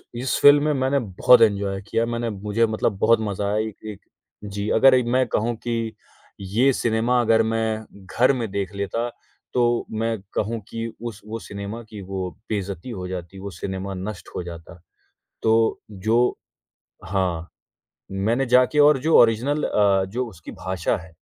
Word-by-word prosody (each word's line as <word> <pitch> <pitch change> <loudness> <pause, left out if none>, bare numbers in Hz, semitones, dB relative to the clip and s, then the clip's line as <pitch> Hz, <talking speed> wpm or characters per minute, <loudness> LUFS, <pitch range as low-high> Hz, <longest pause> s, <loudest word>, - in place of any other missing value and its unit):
इस 125 +2 -1
फिल्म 145 0 +7
में 150 0 +2
मैंने 135 +1 +1
बहुत 115 +2 +4
एन्जॉय 100 -3 +2
किया 115 - +1
मैंने 120 0 -2
मुझे 105 +2 0
मतलब 110 -2 -1
बहुत 115 +2 +4
मज़ा 100 -2 -2
आया 105 +1 0
एक 110 0 -11
एक 100 - -11 0.5
जी 100 +1 -3
अगर 130 +1 +6
मैं 130 +2 +2
कहूँ 115 +2 0
कि 115 -2 -2 0.5
ये 110 +8 +2
सिनेमा 115 +1 +1
अगर 115 -1 +4
मैं, 110 -1 -1 0.2
घर 125 +7 +3
में 115 -5 -3
देख 100 0 -3
लेता, 105 +4 -2 0.4
तो 120 -1 +2
मैं 115 +1 -1 0.2
कहूँ 115 +2 -1
कि 115 0 -4 0.2
उस 115 -3 -6
वो 110 +1 -5
सिनेमा 100 +2 -7
की 105 -2 -8
वो 95 -1 -3 0.2
बेइज़्ज़ती 100 0 -4
हो 95 -6 -5
जाती 90 +1 -7
वो 100 +1 -6
सिनेमा 95 0 -4
नष्ट 95 +1 -6
हो - - -3
जाता, 85 +1 -10 0.6
तो 110 0 +2
जो 110 +5 +1 0.7
हाँ, 90 -3 -1 0.6
मैंने 115 +7 0
जाके 125 +4 +4
और 145 -1 +6
जो 165 - +5
ओरिजिनल 120 +6 +2
अ, 100 -2 +3
जो 120 +7 -3
उसकी 85 -5 -11
भाषा 95 -2 -2
है, 80 -2 -12
110 Hz, 165 wpm, -23 LUFS, 100-120 Hz, 0.7 s, फिल्म